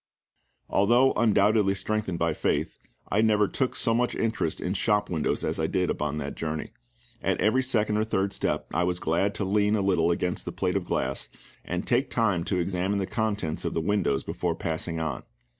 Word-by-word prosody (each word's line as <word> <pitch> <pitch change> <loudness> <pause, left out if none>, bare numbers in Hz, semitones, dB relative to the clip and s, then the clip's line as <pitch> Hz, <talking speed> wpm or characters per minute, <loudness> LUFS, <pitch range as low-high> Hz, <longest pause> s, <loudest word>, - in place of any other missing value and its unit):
Although 120 +7 +4
undoubtedly 105 -3 +3
strengthened 105 -2 -1
by 85 -1 +1
faith, - - -1 0.3
I 105 - +2
never 105 -2 +3
took 130 +4 -1
so 115 - +1
much 120 +1 +1
interest 110 -8 -1
in 90 - -2
shop 105 0 +1
windows 80 -4 0
as - - -1
I - - +1
did - - 0
upon 75 0 -2
that 70 -1 -4
journey. 80 -1 -4 0.5
At - - 0
every 120 +5 +3
second 110 -5 +1
or 110 - +2
third 100 -2 -1
step - - -1
I 90 - +2
was 90 0 0
glad 95 +6 0
to 100 - -1
lean 105 +2 +2
a 105 - +1
little 90 -4 +2
against 90 +1 -1
the - - -3
plate - - -1
glass, 65 +1 -2 0.3
and - - -3
take 135 -1 +1
time 100 -9 +1
to 95 - 0
examine 90 +3 0
the 95 - 0
contents 105 -8 -2
of - - -3
the - - +2
windows 90 -5 0
before 85 -2 -2
passing 80 0 -3
on. 80 -6 -3
100 Hz, 190 wpm, -27 LUFS, 85-110 Hz, 0.5 s, Although